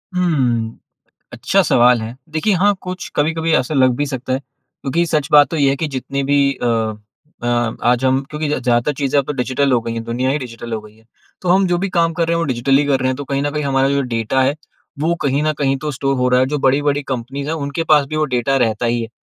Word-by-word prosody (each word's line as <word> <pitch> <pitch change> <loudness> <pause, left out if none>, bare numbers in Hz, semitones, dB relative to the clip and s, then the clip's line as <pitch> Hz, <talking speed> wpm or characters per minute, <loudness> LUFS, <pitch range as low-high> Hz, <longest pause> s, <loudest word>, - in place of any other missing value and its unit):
हुँ, 125 -11 0 0.6
अच्छा - - +1
सवाल 120 0 +4
है। 115 +3 -7 0.2
देखिए, 160 +7 +1
हाँ, 200 +3 +3
कुछ 185 0 -6
कभी-कभी 160 +2 0
ऐसा 130 +5 0
लग 130 -2 +4
भी 145 - 0
सकता 130 -2 -4
है, 130 - +1
क्योंकि 140 +4 -4
सच 150 -4 0
बात 145 -1 +7
तो 165 - -2
यह 140 -3 +3
है 135 - 0
कि 160 - -2
जितनी 140 0 -3
भी 140 -1 +3
अ, 125 - -4 0.8
अ, - - -3 0.4
आज 120 +2 +2
हम 130 0 +3
क्योंकि 150 0 -3
ज़्यादातर 125 -1 +1
चीज़ें 140 0 +1
अब 140 - 0
तो - - -2
डिजिटल 130 +1 0
हो 120 - +3
गई 115 0 -5
हैं, 115 - -4
दुनिया 120 +3 -1
ही 145 - 0
डिजिटल 120 -3 -8
हो 110 - -2
गई 105 0 -16
है, 110 - -24 0.4
तो 180 - -3
हम 190 +2 +4
जो 175 -1 +1
भी 195 +2 -1
काम 165 0 +3
कर 165 0 0
रहे 170 - +2
हैं, - - 0
वो 170 - 0
डिजिटल 130 +2 +2
ही 145 - +2
कर 140 -2 +1
रहे 130 - +1
हैं। 130 - -1
तो 145 - -6
कहीं 140 0 -2
न 145 - -1
कहीं 150 0 -3
हमारा 135 -1 +2
जो 140 0 +1
डाटा 115 +3 0
है, 135 +2 +1 0.4
वो 160 +4 +1
कहीं 140 0 +1
न 155 0 +1
कहीं 135 -1 +1
तो 150 - -1
स्टोर 135 0 -1
हो 125 0 +1
रहा 125 0 +3
है। 130 - +3
जो 150 +2 -2
बड़ी-बड़ी 145 +2 +1
कंपनीज़ 135 +2 -5
हैं, 160 - -1
उनके 140 +1 -3
पास 145 -2 +5
भी 155 - -5
वो 155 - +2
डाटा 125 +3 +1
रहता 120 -2 +1
ही 120 0 0
है, 115 - -5
140 Hz, 260 wpm, -18 LUFS, 125-150 Hz, 0.8 s, बात